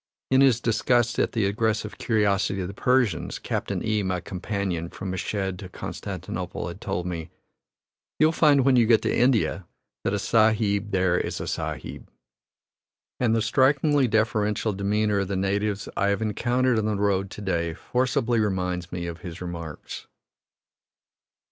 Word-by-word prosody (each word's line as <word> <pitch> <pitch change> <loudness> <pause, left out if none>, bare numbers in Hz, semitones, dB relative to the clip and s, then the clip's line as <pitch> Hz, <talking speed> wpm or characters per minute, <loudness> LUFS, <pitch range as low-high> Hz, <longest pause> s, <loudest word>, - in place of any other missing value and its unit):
In 130 +1 +5
his 130 -4 +5
disgust 120 0 +1
at - - +1
the 110 -3 +1
aggressive 110 +1 -1
curiosity 100 -3 +1
of 90 - -2
the 100 - -7
Persians, 125 -7 +1
Captain - - -3
E, 110 -1 +1
my 95 -2 -1
companion 95 -2 -3
from 95 +1 -6
Meshed 95 0 -3
to 95 -3 -8
Constantinople, - - -5
had - - -10
told 90 - -3
me, 85 -2 -4 0.9
"You'll 155 +1 +4
find, 145 -5 +4
when 135 -2 +5
you 120 -3 +4
get 115 -1 +4
to - - +1
India, 115 -7 +2 0.4
that 105 - 0
a - - 0
Sahib 110 -1 +2
there 90 -2 +2
is - - -3
a - - -4
Sahib," - - -5 1.1
and 115 -3 +2
the 110 - +1
strikingly 140 +3 +3
deferential 110 -1 +1
demeanor 105 +1 +1
of 100 - -1
the 100 - -2
natives 100 +1 -1
I 100 - +1
have 100 +1 +1
encountered 120 +3 +1
on 105 - -1
the 110 -1 0
road 100 -1 +1
to 105 - -9
day 85 -4 -1
forcibly 125 +1 0
reminds 90 -4 -1
me 85 -1 -4
of 85 -1 -6
his 90 -2 -8
remarks. 85 -3 -7
105 Hz, 160 wpm, -25 LUFS, 95-115 Hz, 1.1 s, In